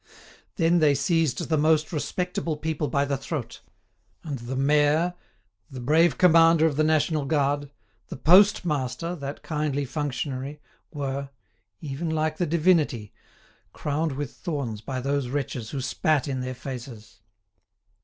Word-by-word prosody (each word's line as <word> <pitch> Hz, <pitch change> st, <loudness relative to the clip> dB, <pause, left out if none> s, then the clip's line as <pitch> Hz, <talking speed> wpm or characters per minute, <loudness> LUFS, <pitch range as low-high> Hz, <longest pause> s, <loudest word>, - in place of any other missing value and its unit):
"Then 170 Hz, -1 st, +3 dB
they 150 Hz, -3 st, +4 dB
seized 165 Hz, -5 st, 0 dB
the 155 Hz, -2 st, +1 dB
most 155 Hz, +2 st, +2 dB
respectable 170 Hz, 0 st, -2 dB
people 155 Hz, -1 st, -2 dB
by 140 Hz, +2 st, +1 dB
the 140 Hz, 0 st, -1 dB
throat; 135 Hz, -1 st, -5 dB, 0.6 s
and 145 Hz, -5 st, -5 dB
the 120 Hz, +3 st, -5 dB
mayor, 150 Hz, +5 st, +3 dB, 0.6 s
the 130 Hz, -, -8 dB
brave 155 Hz, +7 st, +3 dB
commander 165 Hz, -2 st, +6 dB
of 155 Hz, -3 st, +1 dB
the 155 Hz, -, +2 dB
national 155 Hz, -1 st, +1 dB
guard, 145 Hz, -1 st, 0 dB, 0.4 s
the -, -, -7 dB
postmaster, 165 Hz, -3 st, +3 dB
that 140 Hz, -1 st, -7 dB
kindly 150 Hz, -2 st, -1 dB
functionary, 140 Hz, 0 st, -4 dB, 0.3 s
were—even 135 Hz, -, -6 dB
like 155 Hz, 0 st, -1 dB
the 175 Hz, -, 0 dB
Divinity—crowned 155 Hz, -, -1 dB
with 140 Hz, -2 st, -5 dB
thorns 140 Hz, -, -4 dB
by 130 Hz, +2 st, -4 dB
those 140 Hz, 0 st, -1 dB
wretches, 125 Hz, -4 st, -3 dB
who 135 Hz, -, -4 dB
spat 140 Hz, +3 st, 0 dB
in 135 Hz, -2 st, -2 dB
their 130 Hz, 0 st, -4 dB
faces." 125 Hz, -4 st, -9 dB
145 Hz, 130 wpm, -25 LUFS, 135-160 Hz, 0.6 s, commander